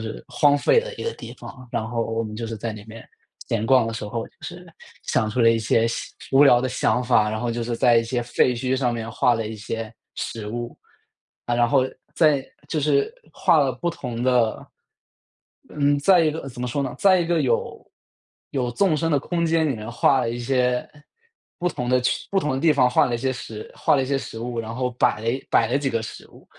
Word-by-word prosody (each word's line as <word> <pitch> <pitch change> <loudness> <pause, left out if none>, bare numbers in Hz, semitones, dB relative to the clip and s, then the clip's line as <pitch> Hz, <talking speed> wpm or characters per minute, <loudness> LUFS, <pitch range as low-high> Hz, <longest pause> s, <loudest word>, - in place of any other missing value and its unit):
是 110 0 -6
荒 145 -1 +3
废 145 - +3
的 - - -3
一 - - -7
个 460 - -2
地 - - -9
方， 125 -1 -11
然 110 - -1
后 115 0 -2
我 115 0 -2
们 105 -1 -6
就 115 - -4
是 115 0 -5
在 115 +1 -4
里 105 -1 -10
面 110 +1 -12 0.4
闲 110 -1 -1
逛 130 -1 +5
的 115 - -3
时 110 - -5
候， 115 +1 -3
就 - - -34
是 175 0 -8 0.4
想 110 - 0
出 110 +4 -1
了 115 -1 +6
一 115 - +2
些 115 +1 +2
细 115 - -5 0.2
无 135 +2 +6
聊 120 -3 +6
的 130 - -1
想 125 0 +1
法， 115 -4 +3
然 110 - -3
后 120 - -1
就 115 0 -3
是 120 0 -2
在 120 0 +4
一 115 - +3
些 120 +1 -2
废 120 +1 +2
墟 130 +2 -1
上 125 -2 0
面 115 -1 -5
画 120 +2 +2
了 115 -1 -2
一 110 0 -6
些 110 +1 -5 0.2
食 110 -2 -5
物。 120 +2 -5 0.7
啊， 120 - 0
然 120 0 +3
后 135 -2 +3 0.3
在 150 -5 +3 0.2
就 155 - -1
是 140 -1 +1 0.2
画 165 - +3
了 135 -2 +2
不 130 +7 -3
同 125 -8 -5
的 120 -3 +1 1.0
嗯。 145 -1 +1
在 180 +5 +5
一 160 - +3
个 155 -2 -6
怎 125 -1 -10
么 125 - -2
说 140 +4 -1
呢。 130 - -3
在 185 -2 +5
一 - - 0
个 170 -2 +1
有 120 -5 -1 0.6
有 125 -3 -1
纵 160 +5 +2
深 165 +1 0
的 145 - +4
空 170 +3 -1
间 160 -1 +2
里 130 - -2
面 110 0 -7
画 135 +3 +3
了 115 - -1
一 120 - -3
些 125 0 0 0.7
不 180 0 0
同 125 -7 -4
的 125 0 +3
区 125 - -1
不 195 - +3
同 150 - -1
的 130 - -1
地 160 0 +4
方 125 -3 +3
画 - - +4
了 120 - -2
一 - - -1
些 130 +1 -1
食 110 -3 -8
画 - - +2
了 135 - +2
一 - - -3
些 140 0 0
食 115 -3 -7
物， 120 0 -4
然 115 0 -6
后 125 +1 -1
摆 120 -4 +2
了 115 - -3 0.2
摆 115 - +3
了 135 +3 +1
几 140 - -1
个 115 -4 -1
食 110 - -9
物， - - -18
125 Hz, 265 characters per minute, -23 LUFS, 115-140 Hz, 1.0 s, 了